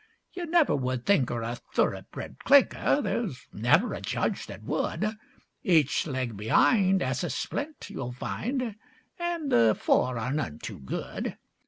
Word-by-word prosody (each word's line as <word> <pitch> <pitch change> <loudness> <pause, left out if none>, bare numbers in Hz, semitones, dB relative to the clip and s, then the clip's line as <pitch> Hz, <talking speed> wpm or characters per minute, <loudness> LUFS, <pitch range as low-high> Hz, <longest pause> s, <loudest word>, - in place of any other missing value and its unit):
'You 355 -2 -5
never 330 -2 +4
would 130 -2 -2
think 165 -12 +3
'er 120 -1 -2
a 120 +2 -3 0.2
thoroughbred - - -1
clinker, 280 +1 +4
There's 185 - -2
never 135 - +3
a - - -5
judge - - -1
that - - -9
would; 215 +1 -1 0.5
Each 160 -4 +3
leg 130 -5 -2
be'ind 190 - +3
'as 130 +4 -1
a 175 - -1
splint, 295 +2 -4
you'll 125 -2 -4
find, 235 - -3 0.4
And 345 -4 -2
the 115 -2 +5
fore 125 -1 +2
are 125 +4 -2
none 145 - -2
too - - -7
good. 65 - -4
155 Hz, 150 wpm, -28 LUFS, -, 0.5 s, the